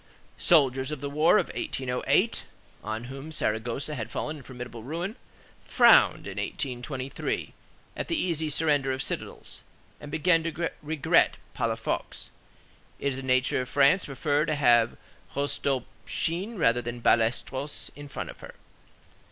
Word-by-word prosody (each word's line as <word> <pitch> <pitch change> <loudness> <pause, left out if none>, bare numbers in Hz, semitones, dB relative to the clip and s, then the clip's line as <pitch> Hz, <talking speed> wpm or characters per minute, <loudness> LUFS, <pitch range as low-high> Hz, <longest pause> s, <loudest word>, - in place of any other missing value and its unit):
Soldiers 135 -5 +4
of 150 - -4
the 140 +1 -4
war 155 +4 +5
of - - 0
1808, 125 -1 0 0.4
on 110 +1 -4
whom 135 +5 -8
Saragossa 120 +2 -1
had 115 -5 -4
fallen 155 +6 -4
in - - -11
formidable 125 -2 -8
ruin, 170 - -4 0.5
frowned - - +5
in - - -5
1823 130 +1 -3 0.4
at - - -4
the 335 - 0
easy 160 -3 0
surrender 145 -3 +2
of 130 0 -2
citadels, - - -5 0.4
and 150 - -9
began 165 +2 +3
to 165 0 -2
regret 150 -1 +2 0.2
Palafox. - - -3 0.7
It 140 - -1
is 130 - -4
the - - -5
nature 130 0 +2
of 125 - -6
France 145 +7 +4
to - - -8
prefer 145 +2 0
to 155 - +1
have 120 -5 +4 0.4
Rostopchine 145 - -2
rather 120 -7 +3
than 120 0 -5
Ballesteros 130 +5 +1
in 145 0 -9
front 140 - -5
of - - -16
her. - - -11
140 Hz, 145 wpm, -27 LUFS, 125-155 Hz, 0.7 s, war